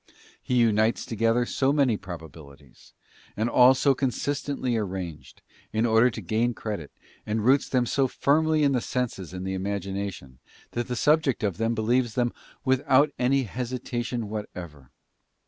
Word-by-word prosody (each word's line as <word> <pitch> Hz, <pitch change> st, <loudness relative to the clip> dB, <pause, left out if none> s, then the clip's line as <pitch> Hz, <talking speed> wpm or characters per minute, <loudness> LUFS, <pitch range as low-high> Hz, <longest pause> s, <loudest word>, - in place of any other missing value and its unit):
He 125 Hz, -, -2 dB
unites 110 Hz, -1 st, +2 dB
together 115 Hz, +2 st, +1 dB
so 135 Hz, +3 st, +1 dB
many 140 Hz, -6 st, +3 dB
probabilities, 80 Hz, -7 st, -12 dB, 0.4 s
and 110 Hz, +2 st, +1 dB
all 125 Hz, +2 st, +6 dB
so 140 Hz, +1 st, +3 dB
consistently 135 Hz, -1 st, -2 dB
arranged, 95 Hz, -7 st, -5 dB, 0.3 s
in 110 Hz, +2 st, +1 dB
order 115 Hz, +2 st, +5 dB
to 110 Hz, -, -7 dB
gain 110 Hz, +5 st, 0 dB
credit, 100 Hz, -9 st, -5 dB, 0.3 s
and 110 Hz, 0 st, -2 dB
roots 135 Hz, +3 st, +3 dB
them 125 Hz, -2 st, +2 dB
so 135 Hz, +3 st, +1 dB
firmly 155 Hz, +4 st, +2 dB
in 140 Hz, -, +4 dB
the 125 Hz, -3 st, +1 dB
senses 115 Hz, -10 st, -3 dB
and 90 Hz, 0 st, -6 dB
the 95 Hz, -, -2 dB
imagination, 95 Hz, -7 st, -4 dB, 0.3 s
that 120 Hz, 0 st, -3 dB
the 125 Hz, -, -3 dB
subject 150 Hz, -2 st, +2 dB
of 100 Hz, -4 st, -1 dB
them 115 Hz, +1 st, 0 dB
believes 120 Hz, +2 st, +1 dB
them 120 Hz, -2 st, +1 dB, 0.3 s
without 130 Hz, +2 st, +3 dB
any 135 Hz, +2 st, +2 dB
hesitation 120 Hz, 0 st, -4 dB
what 105 Hz, 0 st, -5 dB
ever. 75 Hz, -7 st, -10 dB
115 Hz, 150 wpm, -26 LUFS, 100-130 Hz, 0.4 s, all